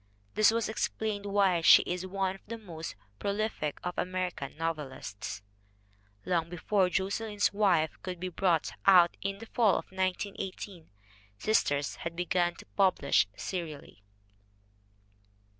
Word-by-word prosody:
This 215 0 +5
may 225 - +1
explain 220 -1 -2
why 195 -4 +3
she - - +8
is 180 +1 -3
one 190 0 -1
of 195 - -13
the 230 +2 -5
most 170 -7 -7 0.2
prolific 200 -7 -2
of 180 0 -3
Ameri 185 0 -1
can 140 +1 -7
novelists. 135 -11 -4 0.8
Long 170 -2 0
before 180 +2 +1
Josselyn's 205 +3 0
Wife 185 -6 +2
could 180 -2 -5
be 185 +1 -3
brought 175 -3 +1 0.2
out 180 -3 +7
in 195 0 -2
the 225 - -9
fall 225 -3 +3
of - - -4
1918, 190 -1 -4 0.5
Sisters 145 - +1
had 170 0 -5
begun 175 0 +1
to - - -13
be - - -37
published 185 - +3
serially. 160 - -6
185 Hz, 135 wpm, -30 LUFS, 165-200 Hz, 0.8 s, she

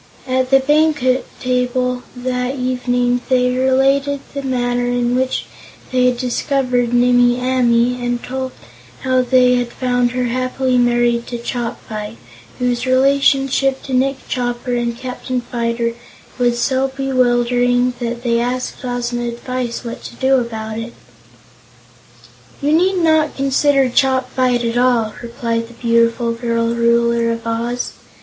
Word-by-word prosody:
At 255 -1 0
the 270 0 +6
banquet 285 -2 +2
table 250 0 0
that 250 +1 -2
evening 245 -1 0
they 250 -1 +3
related 270 +2 +2
the 280 - -3
manner 245 -2 -1
in 245 0 0
which 260 0 -1 0.5
they 255 -1 +3
had 250 -1 +1
discovered 250 -1 0
Nimmie 245 0 +4
Amee, 250 -1 +1
and 245 0 -2
told 260 0 -4 0.5
how 255 -1 +2
they 250 0 +4
had 245 -1 -2
found 245 -1 0
her 250 0 -1
happily 255 +1 0
married 240 -1 +2
to 240 - -4
Chopfyt, 230 -3 -5 0.4
whose 250 0 -1
relationship 270 0 +2
to 270 - -6
Nick 265 +1 0
Chopper 245 0 -2
and 235 -1 -1
Captain 255 0 -4
Fyter 235 -1 -2 0.5
was 240 -1 +2
so 265 +1 +1
bewildering 245 -2 +1
that 235 0 -4
they 235 -1 +1
asked 250 +2 -3
Ozma's 240 -1 -2
advice 250 0 -4
what 235 - -6
to - - -9
do 265 +1 +3
about 220 -2 -4
it. 230 +1 -7 1.7
"You 290 +1 0
need 365 +4 +3
not 315 -2 +2
consider 275 0 +2
Chopfyt 255 -1 +1
at 230 +1 0
all," 240 -4 +2
replied 230 -1 -3
the 240 - -15
beautiful 230 0 +1
girl 230 0 -1
Ruler 235 0 +2
of 230 0 -5
Oz. 235 +2 -2
250 Hz, 135 wpm, -18 LUFS, 240-260 Hz, 1.7 s, the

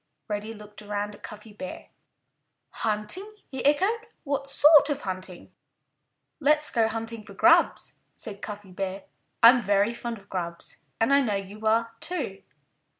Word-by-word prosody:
Reddy 215 +1 -4
looked 210 0 -11
around 205 0 -3
at - - -14
Cuffy 210 0 -10
Bear. 275 +6 -8 0.8
"Hunting!" 225 - -2 0.2
he 265 - -4
echoed. 395 - +2 0.2
"What 275 -1 -2
sort 300 0 +7
of 290 -1 -1
hunting?" 185 -2 -6 0.9
"Let's 300 +1 +3
go 230 -2 +3
hunting 225 0 -4
for 200 -1 -13
grubs!" - - +4 0.2
said 205 -3 -7
Cuffy 205 -2 -7
Bear. 195 +1 -4 0.4
"I'm 240 +2 +9
very 205 +2 +2
fond 235 -1 -5
of 200 -1 -18
grubs. 170 -4 -4
And 225 +5 +3
I 280 - +6
know 220 -6 0
you 200 +3 -5
are, 230 +1 +2
too." 270 - -4
220 Hz, 150 wpm, -27 LUFS, 205-275 Hz, 0.9 s, I'm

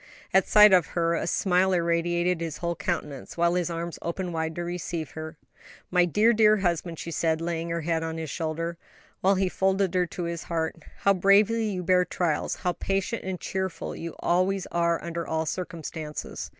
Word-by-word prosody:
At 190 -1 +4
sight 210 -2 +8
of 180 -3 +5
her 170 0 +2
a 165 - -1
smile 185 +1 +2
irradiated 175 0 +1
his 165 -2 -3
whole 170 -1 -2
countenance, 145 -2 -4
while 170 0 +3
his 175 -1 0
arms 170 0 -4
opened 175 +1 -3
wide 160 0 -2
to 175 - -3
receive 175 -2 -4
her. 160 0 -7 0.5
"My 180 -1 +4
dear, 210 +7 +3
dear 215 -1 +5
husband!" 175 -3 -1
she 170 - -6
said, 160 -1 +1
laying 165 0 -3
her 170 0 -2
head 165 0 0
on 160 0 -3
his 160 -3 -4
shoulder, 165 +1 -3 0.4
while 195 +1 +3
he 190 0 +1
folded 190 0 +1
her 180 -1 +2
to 175 - -5
his 170 -1 -4
heart, 165 -1 -2 0.2
"how 200 - +5
bravely 200 +4 +4
you 185 -3 -3
bear 180 +1 +4
trials; 170 -4 -1
how 180 - -1
patient 195 +6 -2
and 185 -1 -4
cheerful 190 -2 -3
you 165 0 -6
always 185 +2 +1
are 170 -1 +1
under 170 0 -4
all 160 0 -1
circumstances." 160 -3 -5
170 Hz, 190 wpm, -26 LUFS, 165-185 Hz, 0.5 s, sight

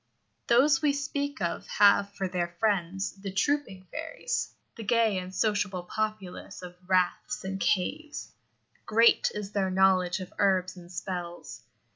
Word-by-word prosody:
Those 270 +4 +5
we 295 -2 +3
speak 280 -2 -3
of 170 - -2
have 200 0 +4
for 195 - -2
their 175 -1 -3
friends 195 -1 -1
the 195 -1 -4
trooping 195 -3 -1
fairies - - -3 0.2
the 230 - -7
gay 220 -2 +2
and 185 0 -7
sociable 205 -3 0
populace 215 -2 -4
of 180 0 -9
raths 190 +6 +1
and 190 0 -4
caves. 295 - -1 0.6
Great 230 +2 +5
is 205 -1 -5
their 195 -2 0
knowledge 185 -1 +3
of 185 - -8
herbs 185 -2 +2
and 175 -1 -13
spells. 175 -1 -6
195 Hz, 140 wpm, -28 LUFS, 185-225 Hz, 0.6 s, Those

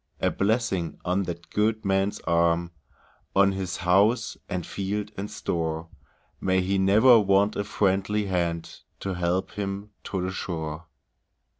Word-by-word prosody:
A - - +1
blessing 100 -5 0
on 95 +2 +1
that 85 -1 -7
good 110 +1 +1
man's 95 +1 +1
arm, 85 0 +2 0.6
On 100 0 +5
his 95 -2 -3
house, 100 +7 +3
and 90 -2 -3
field, 100 +1 -3
and 100 +2 -5
store; 80 -1 -3 0.5
May 95 0 +2
he 95 +1 0
never 110 +6 +6
want 100 +1 +3
a 100 - -1
friendly 100 0 +1
hand 85 -3 -2 0.2
To 95 - -2
help 90 +1 -1
him 100 0 -4
to 95 - -3
the 95 - -2
shore! 80 -3 -5
95 Hz, 140 wpm, -26 LUFS, 85-100 Hz, 0.6 s, never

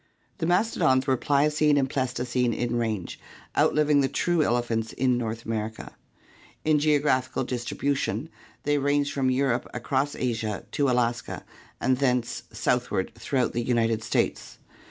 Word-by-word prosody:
The 165 - 0
mastodons 175 - +2
were 130 - +3
Pliocene 150 +2 +2
and 135 -2 +2
Pleistocene 125 -2 -1
in 120 0 -1
range, 110 -6 -2 0.4
outliving 150 -1 +3
the 135 - +2
true 175 +3 +1
elephants 120 -4 0
in 130 -1 +2
North 115 -1 -3
America. 110 0 -4 0.7
In 155 -1 +4
geographical 145 -4 +1
distribution 125 +3 -2 0.3
they 145 0 +2
ranged 145 +1 +1
from 135 -2 +1
Europe 130 -1 0
across 135 +4 -1
Asia 110 -4 -2
to 140 -2 +1
Alaska 120 -1 -1 0.3
and 130 -1 +2
thence 125 -3 0
south - - 0
ward - - -2
throughout 130 -3 -1
the 120 - 0
United 115 -2 +1
States. - - -1
130 Hz, 135 wpm, -26 LUFS, 120-145 Hz, 0.7 s, In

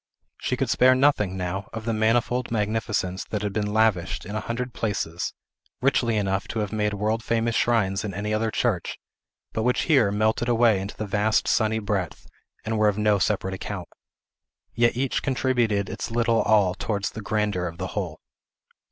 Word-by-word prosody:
She - - -1
could - - 0
spare 130 +1 +5
nothing, 125 -9 +2
now, 95 +2 -3
of 110 -1 -6
the 115 - 0
manifold 120 +3 +1
magnificence 105 -4 -1
that 105 -1 -3
had 100 -1 -2
been 105 0 -1
lavished, 105 -6 +1
in 105 +3 -6
a - - 0
hundred 120 +2 -4
places, 90 -6 -2 0.5
richly 125 -4 +2
enough 95 -1 -1
to 115 - -3
have 105 0 -3
made 105 -1 0
world 110 +3 -1
famous 115 0 0
shrines 105 -4 +1
in 105 - -3
any 105 +3 -3
other 110 +1 +1
church, 110 -5 -1 0.6
but 110 - -1
which 125 +2 +2
here 135 -10 +4
melted 110 +3 +1
away 115 -4 +4
into 100 +2 -7
the 110 - -3
vast 105 +2 +1
sunny 110 0 +2
breadth, 100 -5 -3 0.4
and 110 0 -1
were 105 - +4
of 105 -1 +1
no 105 -1 +3
separate 95 0 0
account. 95 - -6 0.8
Yet 120 0 +2
each 130 0 0
contributed 120 -7 +1
its - - -5
little 115 0 +2
all 105 -4 +3
towards 100 0 -2
the 110 - -7
grandeur 105 -4 -1
of 85 0 -8
the - - -4
whole. - - -3
110 Hz, 180 wpm, -25 LUFS, 100-115 Hz, 0.8 s, spare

